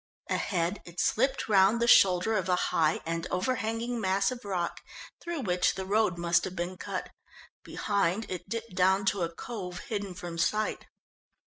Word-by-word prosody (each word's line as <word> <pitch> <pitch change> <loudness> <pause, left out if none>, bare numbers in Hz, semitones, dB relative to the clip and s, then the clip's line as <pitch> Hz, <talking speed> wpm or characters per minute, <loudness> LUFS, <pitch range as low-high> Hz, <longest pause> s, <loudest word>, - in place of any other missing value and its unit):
Ahead 175 +1 -1
it 175 0 -10
slipped 265 +4 +1
round 200 +2 +4
the 235 - +1
shoulder 190 0 +5
of 190 -2 -1
a 180 - +4
high 160 -3 +1
and 165 +1 -2
over 230 +8 0
hanging 230 +2 -2
mass 195 +2 +2
of 250 -1 -7
rock, 185 -4 -3 0.4
through 340 -3 -4
which 180 -5 +1
the 190 - -4
road 200 -2 +1
must 170 +1 +2
have 185 - -6
been 175 +1 -3
cut. - - -5 0.5
Behind 200 +1 0
it 185 +1 -6
dipped 230 -1 -5
down 190 +2 +3
to 200 - -4
a 170 - 0
cove, 180 0 -7
hidden 200 -4 -3
from 170 -1 -6
sight. 215 +5 0
190 Hz, 170 wpm, -29 LUFS, 180-220 Hz, 0.5 s, shoulder